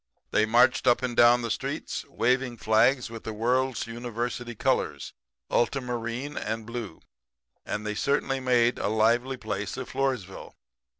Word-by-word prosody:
"They 105 0 +3
marched 120 +3 +4
up 120 +1 +4
and 125 -2 -2
down 120 +1 +6
the 115 - -2
streets - - -3
waving 125 0 0
flags 115 +3 +2
with 115 -1 -8
the 110 - -5
World's 125 +2 0
University 120 +1 -4
colors - - -1 0.4
ultra 135 +3 +2
marine 125 +3 -4
and 110 +1 -3
blue 115 -7 -6 0.7
and 105 +1 -3
they 105 - -2
certainly 135 +3 0
made 125 -2 +2
a - - -1
lively 115 +5 +2
place 105 -1 -4
of 130 - -6
Floresville. 125 -9 -3
120 Hz, 145 wpm, -27 LUFS, 110-125 Hz, 0.7 s, down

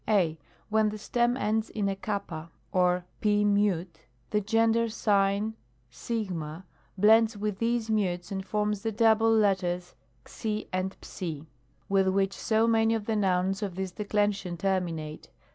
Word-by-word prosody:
I. 175 -7 +2 0.3
When 215 0 +3
the 215 - -5
stem 240 +3 +1
ends 220 -1 0
in 205 -2 -1
a 195 - -1
xanna 195 -5 -4 0.2
or 180 -1 +2 0.2
Pi 210 -1 +3
Mute 200 -6 0 0.2
the 210 - +2
gender 225 +2 +2
sign 205 0 +1 0.6
o 180 -7 -3 0.3
blends 220 +2 +5
with 205 -1 -3
these 230 -1 0
mutes 180 -4 -1
and 190 -1 -3
forms 210 +1 -1
the 225 - -1
double 225 0 +4
letters 185 -5 +1 0.3
^ 215 -1 -4
and 185 +1 -2
^, 160 -5 -6 0.4
with 195 -1 +2
which 195 +1 +1
so 220 +3 +1
many 225 0 +3
of 215 -2 -3
the 225 - 0
nouns 190 -1 +1
of 195 -4 -3
this 190 0 -3
declension 205 -3 -1
terminate. 170 -5 -2
205 Hz, 145 wpm, -28 LUFS, 185-220 Hz, 0.6 s, blends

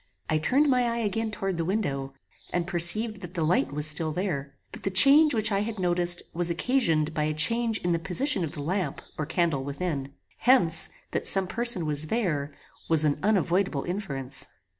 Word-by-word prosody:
I 155 - +1
turned 270 - +1
my 250 -3 +2
eye 235 - -3
again 220 +1 -2
toward 195 -4 -4
the 165 - -2
window, 140 -8 -3 0.4
and 175 -1 -2
perceived 190 +5 +2
that 180 -1 -10
the 165 - -2
light 155 -4 0
was 150 +1 -1
still 155 +1 +2
there; 150 -6 -4 0.2
but - - -10
the - - -2
change 280 +8 +6
which 220 0 +1
I 195 - 0
had 215 +2 -4
noticed 175 -1 +2
was 175 0 -1
occasioned 170 - 0
by 150 -1 -1
a 155 0 -3
change 230 +7 0
in 175 - -1
the 170 - 0
position 195 - +1
of 160 -1 -5
the 145 -4 -7
lamp 185 +4 -3
or 155 - -5
candle 160 -5 -1
within. 140 -1 -5 0.2
Hence, 205 -11 +4 0.2
that - - -1
some 195 -1 +6
person 230 -3 0
was 150 0 +1
there 155 -10 -2 0.4
was 160 -2 +7
an 145 -1 0
unavoidable 185 -6 0
inference. 140 -9 -4
175 Hz, 190 wpm, -25 LUFS, 155-215 Hz, 0.4 s, was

